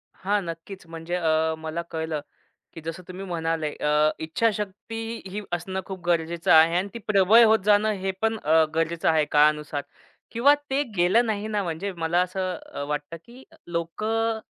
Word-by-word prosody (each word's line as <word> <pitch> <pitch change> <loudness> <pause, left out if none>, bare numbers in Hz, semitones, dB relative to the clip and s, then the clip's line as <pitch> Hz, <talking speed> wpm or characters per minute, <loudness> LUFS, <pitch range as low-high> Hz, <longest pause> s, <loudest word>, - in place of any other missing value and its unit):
हां. 205 +2 0
नक्कीच, 170 +3 -8
म्हणजे 165 +1 -5
अ, 160 -2 +1
मला 160 +1 -4
कळलं, 160 -2 -3 0.5
की 165 - -9
जसं 165 +3 -6
तुम्ही 185 +2 -7
म्हणाले 165 -3 -2
अ, 150 +1 +2
इच्छाशक्ती 225 +5 -2
ही 205 +3 -4
असणं 185 +2 -3
खूप 190 -1 -7
गरजेचं 170 -1 0
आहे 160 +1 +7
आणि 190 +3 0
ती 235 - -6
प्रबळ 210 +3 +6
होत 220 0 +5
जाणं 210 +1 +4
हे 190 0 0
पण 225 0 +1
अ, 160 +2 +5
गरजेचं 165 +1 +1
आहे 160 -2 +3
काळानुसार 150 -1 +3 0.5
किंवा 260 +5 +5 0.2
ते 275 +2 +1
केलं 185 +7 +4
नाही 215 -1 -2
ना, 210 -2 -1
म्हणजे 175 +3 -3
मला 170 +2 +1
असं 185 0 -2 0.2
अ, 140 - -4
वाटतं, 150 +2 -4
की 250 +3 -14
अ, - - -18
लोकं 220 +7 -1
175 Hz, 170 wpm, -25 LUFS, 160-210 Hz, 0.5 s, आहे